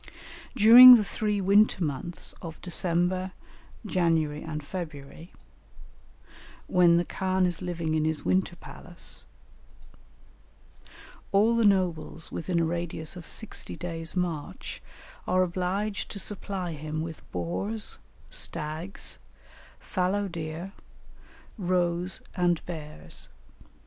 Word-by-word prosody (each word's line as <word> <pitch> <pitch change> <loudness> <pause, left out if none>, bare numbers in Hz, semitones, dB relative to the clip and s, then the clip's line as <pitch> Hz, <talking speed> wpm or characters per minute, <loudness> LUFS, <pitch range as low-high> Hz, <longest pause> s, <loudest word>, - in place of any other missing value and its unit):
During 245 +3 +11
the 220 - +3
three 210 0 -1
winter 200 0 +4
months 155 +3 -3
of 165 -2 -8
December, 180 +1 0 0.5
January, 165 -6 +1
and 150 -1 -5
February, 160 -1 -7 1.3
when 175 -2 +5
the 175 - +1
khan 190 0 0
is 175 -1 -2
living 170 -3 -2
in 155 -1 +1
his 155 -1 -1
winter 185 -1 +1
palace, 175 0 -8 2.1
all 215 +3 +4
the 230 - +3
nobles 175 -5 +1
within 170 0 -1
a 165 - +2
radius 170 -1 -4
of 175 -3 -9
sixty 220 - -5
days' 165 -1 -5
march 175 -1 -3 0.5
are 185 0 +3
obliged 185 +3 -2
to - - -6
supply 195 -3 -3
him 155 0 -4
with 160 -1 -6
boars, 95 +5 -2 0.3
stags, 160 +4 -2 0.6
fallow 195 +2 -1
deer, 165 +1 -6 0.9
roes, 180 -1 0
and 175 -2 +1
bears. 155 -3 -7
175 Hz, 105 wpm, -27 LUFS, 160-190 Hz, 2.1 s, During